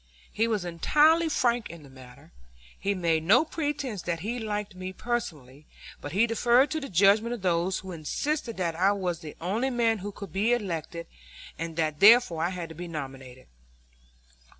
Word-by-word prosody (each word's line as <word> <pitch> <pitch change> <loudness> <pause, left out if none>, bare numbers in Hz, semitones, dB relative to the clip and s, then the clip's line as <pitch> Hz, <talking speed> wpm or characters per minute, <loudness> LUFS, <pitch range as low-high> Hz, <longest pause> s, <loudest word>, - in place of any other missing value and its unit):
He 225 +2 0
was 210 -5 -1
entirely 305 - +3
frank 240 -5 0
in 170 -2 -11
the 140 - -14
matter. 130 -2 -15 0.5
He 200 +1 -1
made 165 -3 +1
no 195 - +4
pretense 290 - -3
that 170 -2 -3
he 235 +6 -3
liked 210 -2 -4
me 185 0 -7
personally; 155 - -5 0.3
but 145 - -6
he 200 +7 +3
deferred 240 +4 +3
to 315 - -1
the 275 - -7
judgment 205 +6 +3
of 215 - -12
those 180 +1 +1
who 190 - -8
insisted 230 - -3
that 170 -3 -1
I 190 +4 +3
was 180 -4 -3
the 155 -2 -9
only 215 +10 -1
man 230 -3 +1
who 205 +2 -6
could 200 -4 -10
be 215 +5 +2
elected, 170 -6 -3 0.5
and 165 0 -5
that 155 -2 -1
therefore 205 -6 +6
I 170 - +1
had 180 -3 -6
to - - -9
be 175 +2 -7
nominated. 135 -5 -8
190 Hz, 180 wpm, -27 LUFS, 165-235 Hz, 0.5 s, therefore